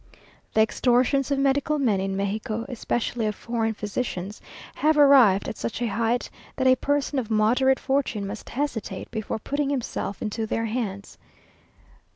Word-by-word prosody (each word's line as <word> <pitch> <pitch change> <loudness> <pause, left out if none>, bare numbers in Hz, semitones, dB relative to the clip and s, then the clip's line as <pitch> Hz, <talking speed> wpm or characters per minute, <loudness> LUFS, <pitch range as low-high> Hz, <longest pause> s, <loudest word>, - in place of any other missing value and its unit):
The 220 - +5
extortions 250 +4 +2
of 280 - +1
medical 280 +2 +1
men 230 -9 +2
in 195 0 -2
Mexico, 215 +3 -2
especially 240 -2 -2
of 210 - -2
foreign 225 -2 -2
physicians, 205 -2 -4 0.3
have 310 +1 +2
arrived 265 -9 +6
at - - -5
such 230 - -4
a 245 - 0
height, 230 +1 0 0.3
that 260 - -1
a 260 0 +6
person 285 +1 0
of 230 -4 -5
moderate 240 +5 +3
fortune 265 -7 -1
must 200 +3 -7
hesitate 260 -5 -4
before 220 -2 -3
putting 285 +5 -2
himself 250 -7 -3
into 220 +1 -3
their 225 +1 -1
hands. 215 -4 -4
235 Hz, 155 wpm, -25 LUFS, 215-270 Hz, 0.3 s, arrived